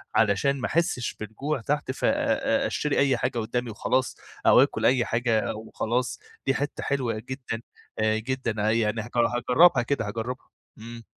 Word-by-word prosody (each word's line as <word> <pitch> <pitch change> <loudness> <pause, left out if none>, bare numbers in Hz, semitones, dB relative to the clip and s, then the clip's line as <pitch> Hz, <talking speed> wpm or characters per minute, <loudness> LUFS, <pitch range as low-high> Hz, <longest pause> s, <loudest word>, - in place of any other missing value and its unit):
علشان 110 +6 +2
ما 115 - 0
أحسش 160 -8 0
بالجوع 125 +7 -3
تحت 145 +2 -1
ف 130 - -3
أ - - +5 0.6
أ - - +1
أشتري 150 - -1
أي 135 -2 +3
حاجة 120 0 -1
قدامي 120 +2 -2
وخلاص، 130 +4 -1 0.3
أو - - +7
آكل - - -1
أي 125 -1 +4
حاجة 115 -2 0
وخلاص، 115 +3 -2 0.3
دي 135 - +2
حتّة 145 +2 -3
حلوة 130 -4 0 0.2
جدًا، 130 -4 -4 0.4
جدًا، 110 +3 0 0.2
يعني 110 -1 +1
هاج 115 - -9
هاجربها 125 +5 +4
كده، 120 -3 -1
هاجربها، 115 +4 -5 0.3
إمم. 115 +1 -9
120 Hz, 155 wpm, -26 LUFS, 115-135 Hz, 0.6 s, أو